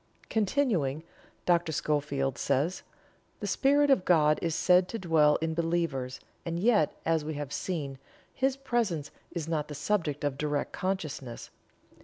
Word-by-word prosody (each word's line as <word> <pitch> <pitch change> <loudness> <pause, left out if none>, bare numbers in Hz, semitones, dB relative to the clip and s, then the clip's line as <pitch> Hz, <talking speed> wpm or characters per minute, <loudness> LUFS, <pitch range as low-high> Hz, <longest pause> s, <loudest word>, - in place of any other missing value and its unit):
Continuing, 195 - +1 0.4
Dr. 175 -2 +2
Schofield 140 -3 0
says: 140 +7 0 0.6
"The - - -4
Spirit 285 +1 +3
of 215 -9 +4
God 155 -4 +4
is 165 -2 -1
said 180 +2 +4
to 230 - -3
dwell 160 -6 +4
in 160 0 0
believers, 165 -6 -1 0.2
and 170 0 -3
yet, 205 -7 +3
as 160 -1 +2
we 155 0 -4
have 145 -1 -5
seen, 145 -7 -3 0.3
His 270 0 +1
presence 215 - -1 0.2
is 165 -3 -4
not 155 -2 -1
the 150 - -7
subject 155 -5 -1
of 140 -1 -1
direct 150 -1 -1
consciousness. 155 -10 -4
165 Hz, 145 wpm, -29 LUFS, 145-185 Hz, 0.6 s, of